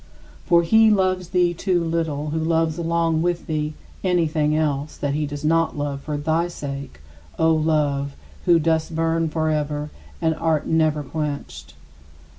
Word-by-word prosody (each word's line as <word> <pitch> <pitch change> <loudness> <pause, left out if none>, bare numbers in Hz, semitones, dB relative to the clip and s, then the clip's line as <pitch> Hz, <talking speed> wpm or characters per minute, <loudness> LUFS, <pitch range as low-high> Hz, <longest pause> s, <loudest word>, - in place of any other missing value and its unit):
For 170 -2 +5
he 220 +6 +5
loves 185 -3 +1
thee 180 -1 +2
too 175 0 0
little 160 -3 -2
who 160 - -1
loves 160 0 +1
along 165 -1 +1
with 175 0 -1
thee 155 -1 -2 0.3
anything 160 -4 +1
else 150 -1 -1
that 145 -1 -1
he 150 0 -1
does 145 +1 -6
not 165 0 +2
love 145 -1 -3
for 150 0 -3
thy 160 +3 0
sake, 140 - -7 0.4
O 160 0 +4
Love, 150 -3 0 0.3
who 175 -2 +6
dost 160 0 0
burn 165 0 +1
forever 150 -1 -1 0.3
and 160 -1 +1
art 160 -1 0
never 155 -2 +1
quenched. 150 0 -5
160 Hz, 150 wpm, -22 LUFS, 150-165 Hz, 0.4 s, who